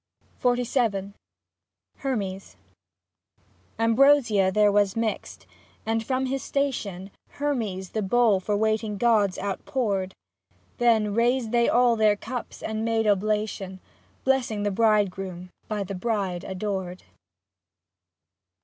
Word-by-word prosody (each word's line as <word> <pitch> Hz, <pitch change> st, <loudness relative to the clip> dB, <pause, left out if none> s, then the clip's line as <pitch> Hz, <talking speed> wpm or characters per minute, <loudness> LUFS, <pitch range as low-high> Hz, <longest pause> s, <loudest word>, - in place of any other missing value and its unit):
XLVII 240 Hz, -5 st, 0 dB, 0.8 s
HERMES 200 Hz, -8 st, -4 dB, 1.2 s
Ambrosia 230 Hz, -4 st, +4 dB
there 210 Hz, +1 st, +4 dB
was 200 Hz, -1 st, +2 dB
mixed, 225 Hz, -1 st, -3 dB, 0.4 s
and 225 Hz, 0 st, 0 dB
from 260 Hz, +2 st, -1 dB
his 270 Hz, +1 st, -2 dB
station 205 Hz, -9 st, -2 dB, 0.2 s
Hermes 220 Hz, -11 st, -2 dB
the 220 Hz, -, -2 dB
bowl 215 Hz, 0 st, +3 dB
for 205 Hz, +2 st, -1 dB
waiting 215 Hz, -1 st, 0 dB
gods 210 Hz, -4 st, +2 dB
outpoured; 200 Hz, -2 st, -2 dB, 0.6 s
Then 220 Hz, -4 st, +3 dB
raised 235 Hz, +1 st, +1 dB
they 235 Hz, -1 st, +3 dB
all 245 Hz, -1 st, +4 dB
their 215 Hz, -2 st, +3 dB
cups 240 Hz, +3 st, -7 dB
and 220 Hz, 0 st, -3 dB
made 225 Hz, -1 st, +1 dB
oblation. 205 Hz, -2 st, -1 dB, 0.4 s
Blessing 250 Hz, -6 st, +1 dB
the 205 Hz, -, 0 dB
bridegroom 195 Hz, -4 st, 0 dB, 0.2 s
(by 210 Hz, -2 st, -2 dB
the 195 Hz, +1 st, -6 dB
bride 195 Hz, -3 st, -2 dB
adored). 190 Hz, -2 st, -4 dB
215 Hz, 105 wpm, -25 LUFS, 195-235 Hz, 1.2 s, Ambrosia